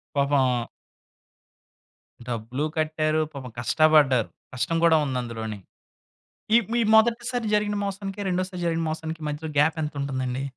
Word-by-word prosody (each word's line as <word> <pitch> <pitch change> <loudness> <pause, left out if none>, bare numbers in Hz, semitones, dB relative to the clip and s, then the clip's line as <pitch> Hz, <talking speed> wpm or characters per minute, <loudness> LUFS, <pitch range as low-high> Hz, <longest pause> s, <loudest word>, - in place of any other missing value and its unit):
పాపం 135 -4 +2 1.6
డబ్బులూ 120 +3 -3
కట్టారు. 155 0 +1
పాపం 130 -3 -8
కష్టపడ్డారు. 145 -2 +4 0.2
కష్టం 165 +7 -1
గూడా 165 -1 +6
ఉంది 130 -2 -2
అందులోని. 110 -3 -5 1.0
ఈ - - +9 0.2
మీ 240 - +2
మొదటిసారి 235 +2 +2
జరిగిన 210 0 0
మోసానికి, 195 0 -5
రెండోసారి 185 0 -2
జరిగిన 165 -1 0
మోసానికి 160 0 -5
మధ్యలో 150 +1 -4
గ్యాపెంతుంటుందండి? 140 -4 0
155 Hz, 110 wpm, -25 LUFS, 130-175 Hz, 1.6 s, ఈ